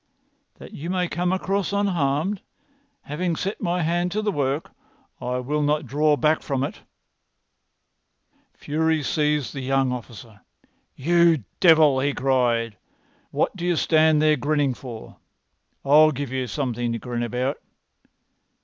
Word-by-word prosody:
"That - - -12
you 165 +4 -7
may 180 -1 0
come 175 +1 -1
across 195 +1 -1
unharmed. 185 -2 0 0.6
Having 170 +4 -2
set 195 +6 -4
my 175 -2 0
hand 175 +2 0
to 215 +1 -1
the 210 - +1
work, 140 -2 -2 0.5
I 125 +1 -2
will 145 +4 -1
not 150 +1 +1
draw 150 +3 +2
back 155 +1 +2
from 135 -2 -2
it." - - -5 1.8
Fury 160 +1 0
seized 150 -1 0
the 135 - -5
young 135 0 +1
officer. 115 -3 -9 0.5
"You 170 -1 +3 0.2
devil!" 155 -6 +6
he 140 +1 0
cried. 120 -5 +1 0.5
"What - - -1
do 175 - -7
you 175 -1 +1
stand 155 -1 +3
there 155 -1 +4
grinning 145 0 +1
for? 120 -3 -10 0.7
I'll 150 +3 +6
give 140 -2 -5
you 130 -1 -2
something 120 -2 -2
to - - -2
grin 120 0 -4
about. 125 +4 -2
150 Hz, 140 wpm, -23 LUFS, 130-170 Hz, 1.8 s, devil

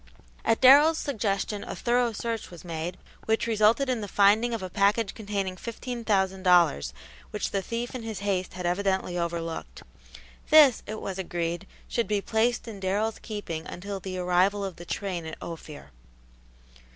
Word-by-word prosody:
At 225 - +2
Darrell's 290 +5 +8
suggestion 210 -7 -2
a - - -6
thorough 240 0 +1
search 225 +1 -4
was 175 -1 -12
made, 170 +2 -4 0.3
which 220 +1 +1
resulted 225 +4 +3
in 250 -3 0
the 205 - -4
finding 205 +5 +4
of 225 -4 -3
a - - -3
package 200 +2 +2
containing 200 -3 -3
fifteen 235 +3 -6
thousand 190 -3 +1
dollars 170 - +4 0.4
which - - -3
the 195 - 0
thief 235 +4 -4
in 255 - -5
his 220 -3 -5
haste 190 -3 -1
had 180 -1 -6
evidently 190 0 0
overlooked. 165 - -4 0.7
This, 295 -6 +7
it 215 +1 -5
was 190 -1 -5
agreed, 175 0 -3 0.2
should 235 - -1
be 210 -1 +1
placed 225 +4 0
in 215 -3 -7
Darrell's 205 +4 -1
keeping 190 -8 -5
until 195 +2 -6
the 185 0 -5
arrival 185 +3 +2
of 190 -3 -6
the 175 - -9
train 180 -2 -3
at 160 - -7
Ophir. 155 - -9
200 Hz, 165 wpm, -27 LUFS, 180-225 Hz, 0.7 s, Darrell's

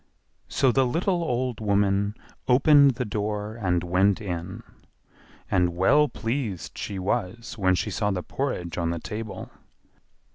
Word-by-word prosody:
So 135 -2 +2
the 135 +2 +3
little 175 +6 0
old 125 -5 -1
woman 100 -1 +1 0.3
opened 140 +1 +6
the 125 +1 -2
door 105 0 -3
and 90 -6 0
went 95 +3 +2
in; 95 +1 -5 0.9
and 90 -2 +2
well 145 +12 +4
pleased 115 - -4
she 100 - -5
was 105 +3 -3
when 95 -4 +2
she 105 - -2
saw 105 +3 0
the 90 -3 -2
porridge 90 -12 -3
on 85 -1 0
the 85 - -2
table. 105 +2 -6
105 Hz, 140 wpm, -25 LUFS, 95-125 Hz, 0.9 s, opened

